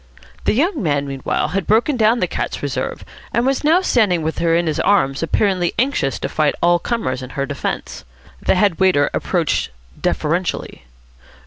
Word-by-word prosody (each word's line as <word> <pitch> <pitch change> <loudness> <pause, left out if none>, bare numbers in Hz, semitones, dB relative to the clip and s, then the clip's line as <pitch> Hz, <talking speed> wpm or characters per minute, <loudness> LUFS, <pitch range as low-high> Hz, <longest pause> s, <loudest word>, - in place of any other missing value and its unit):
The - - +3
young 315 - +1
man 145 -5 0
meanwhile 135 -1 -2
had 195 -2 -2
broken 230 +7 +3
down 230 +1 +3
the - - +2
cat's - - -4
reserve, - - -3 0.3
and 235 - +1
was 270 +2 0
now 325 +5 +4
standing 200 - +2
with 160 +1 -2
her 165 -1 +2
in 170 +1 +1
his 155 -2 -1
arms, 135 -10 +2
apparently 180 +1 +1
anxious 245 - 0
to - - -1
fight 155 -2 +1
all 175 0 +3
comers 170 - -2
in 130 - -7
her 140 0 -3
defence. 140 -1 -4 0.4
The - - +2
head 185 -3 +2
waiter 185 -7 +3
approached 170 -5 0 0.3
deferentially. 170 - -2
175 Hz, 175 wpm, -19 LUFS, 150-225 Hz, 0.4 s, now